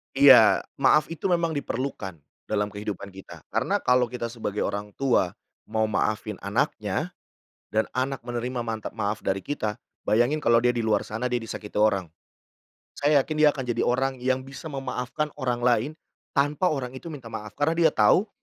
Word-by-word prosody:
Iya. 135 -5 +8 0.2
Maaf 150 +4 +4
itu 165 +4 -2
memang 170 -2 +1
diperlukan 130 - -3 0.3
dalam 105 0 -1
kehidupan 100 -1 -6
kita, 95 0 -12
karena - - 0
kalau 125 -1 +4
kita 115 -1 -5
sebagai 110 -3 -3
orang 100 0 -4
tua 125 -10 +1 0.3
mau 110 0 0
maafin 105 -1 -1
anaknya 100 +1 -1 0.6
dan 110 +1 +1
anak 130 -1 -2
menerima 120 0 -3
mantap 110 -1 -5
maaf 105 0 -1
dari 95 0 -2
kita, 110 -7 -2 0.3
bayangin 120 +8 +3
kalau 115 -5 +4
dia 125 - +4
di 120 - -2
luar 110 -2 +1
sana 115 +4 -3
dia 125 - 0
disakiti 110 -2 -6
orang. 105 -4 +2 0.9
Saya 145 -1 +3
yakin 155 - -5
dia 150 - +8
akan 140 -2 -3
jadi 120 - -1
orang 130 +2 +1
yang 130 0 0
bisa 140 +4 -8
memaafkan 135 +1 -3
orang 125 -4 -2
lain, 125 +4 +3 0.5
tanpa 150 +6 +2
orang 130 -4 -3
itu 130 +6 -8
minta 145 -6 -9
maaf 105 -2 -7
karena 145 +3 +2
dia 165 -1 +4
tahu 175 - +4
125 Hz, 170 wpm, -26 LUFS, 110-140 Hz, 0.9 s, Iya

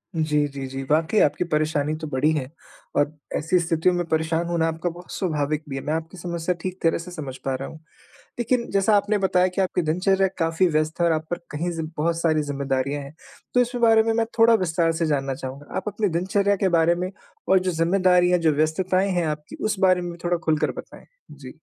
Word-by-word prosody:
जी, 150 -2 +1
जी, 140 -1 -6
जी 135 +1 -5
वाक़ई 160 +7 +2
आपकी 150 - +2
परेशानी 155 -2 0
तो 155 - -4
बड़ी 145 +2 +1
है 135 -3 -2 0.5
और 145 +1 +2 0.2
ऐसी 165 +4 +2
स्थितियों 170 +1 +1
में 175 -1 -1
परेशान 160 +1 0
होना 170 -1 +1
आपका 165 +2 -2
बहुत 175 +1 -11
स्वाभाविक 155 -4 -1
भी 135 - -4
है 135 - -3
मैं 150 - -1
आपकी 165 +3 -4
समस्या 170 0 -2
ठीक 185 0 -5
तरह 165 - +3
से 175 +2 -8
समझ 140 -7 -6
पा 135 -1 0
रहा 135 +1 -5
हूँ। 160 - -11 0.6
लेकिन 240 0 0
जैसा 200 +2 +3
आपने 205 +1 +1
बताया 185 -1 +2
कि 195 - 0
आपकी 185 -1 0
दिनचर्या 190 +4 +2
काफ़ी 165 +2 +2
व्यस्त 155 +1 -1
है 170 - +4
और 165 - +3
आप 155 0 -2
पर 175 - -1
कहीं 165 +4 -2
ज़ि 165 - -2
बहुत 165 +2 0
सारी 155 -2 +2
ज़िम्मेदारियाँ 140 0 -2
हैं। 140 +2 -11 0.4
तो 250 - +5
इस 245 0 +1
बारे 225 -1 +6
में 225 0 +1
मैं 230 0 +1
थोड़ा 230 0 +6
विस्तार 170 -4 +1
से 165 0 -1
जानना 135 -3 0
चाहूँगा। 135 +2 -8
आप - - -2
अपनी 210 0 -1
दिनचर्या 200 +2 +1
के 190 0 +1
बारे 165 +1 +4
में 180 +1 -3 0.4
और 190 - +6
जो 185 0 -1
ज़िम्मेदारियाँ, 180 +1 +3
जो 160 -2 +2
व्यस्तताएँ 185 +6 +1
हैं 175 -2 0
आपकी 150 0 -5
उस 210 -2 0
बारे 185 -1 +4
में 175 0 -4
भी 170 - -12
थोड़ा 175 0 +2
खुलकर 155 -1 +1
बताएँ? - - -16 0.2
जी। - - -12
165 Hz, 220 wpm, -24 LUFS, 155-185 Hz, 0.6 s, बारे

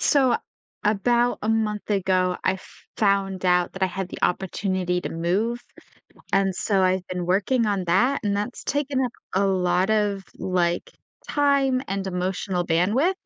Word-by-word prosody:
so, 270 -4 +4 0.5
about 240 +4 +2
a 215 - -2
month 220 -2 0
ago, 185 -2 +1
I - - +3
f 190 - -12 0.3
found 195 -2 +1
out 180 -1 +3
that 190 - -7
I - - +5
had 185 0 -4
the - - -8
opportunity 185 -1 0
to - - -4
move, 200 +9 -1 0.7
and 195 -1 +2
so, 195 +1 +1
I've 185 0 +1
been 180 -1 -3
working 205 +6 +2
on 200 -3 0
that, 240 +11 +3
and 200 -1 +1
that's 210 +4 -4
taken 285 -2 -1
up 245 - -3 0.2
a 195 +1 +3
lot 185 0 +1
of, 205 -2 +1 0.2
like, 180 -2 0 0.4
time 275 -3 +2
and 195 0 -2
emotional 180 0 -2
bandwidth, 210 - +2
195 Hz, 160 wpm, -24 LUFS, 185-225 Hz, 0.7 s, I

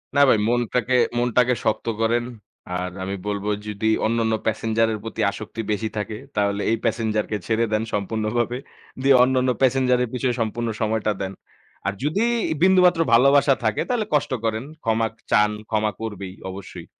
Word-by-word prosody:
না 140 - +5
ভাই - - +5
মনটাকে, 120 +1 +1 0.2
মনটাকে 125 +1 +3
শক্ত 110 - 0 0.2
করেন। 120 +1 +2 0.5
আর 90 0 -3
আমি 100 +1 -3
বলবো 105 0 -2 0.2
যদি 105 +1 -2 0.2
অন্যান্য 115 0 +1
প্যাসেঞ্জারের 110 0 +1
প্রতি 115 - -5
আসক্তি 110 +1 -6
বেশি 110 +1 -1
থাকে 105 +1 -3 0.2
তাহলে 100 0 +1
এই 115 - +2
প্যাসেঞ্জার 110 -2 0
কে 105 - 0
ছেড়ে 115 +1 +2
দেন 110 - +1
সম্পূর্ণভাবে। 110 +4 -1 0.4
দিয়ে 135 0 +5
অন্যান্য 130 0 +2
প্যাসেঞ্জার 130 -1 +3
এর 120 - -3
পিছনে 125 0 0
সম্পূর্ণ 115 +1 -2
সময়টা 110 0 +1
দেন। 95 0 -3 0.5
আর 100 - 0
যদি 160 +10 +1 0.4
বিন্দুমাত্র 180 -2 +5
ভালোবাসা 140 +3 +6
থাকে 110 -1 +1
তাহলে 240 -4 0
কষ্ট 145 -2 +1
করেন। 110 +1 -1 0.2
ক্ষমা 115 0 +1 0.2
চান। 105 0 +4 0.2
ক্ষমা 110 -1 +1
করবেই 100 -4 -5 0.2
অবশ্যই। 95 +1 -9
115 Hz, 155 wpm, -23 LUFS, 105-125 Hz, 0.5 s, ভালোবাসা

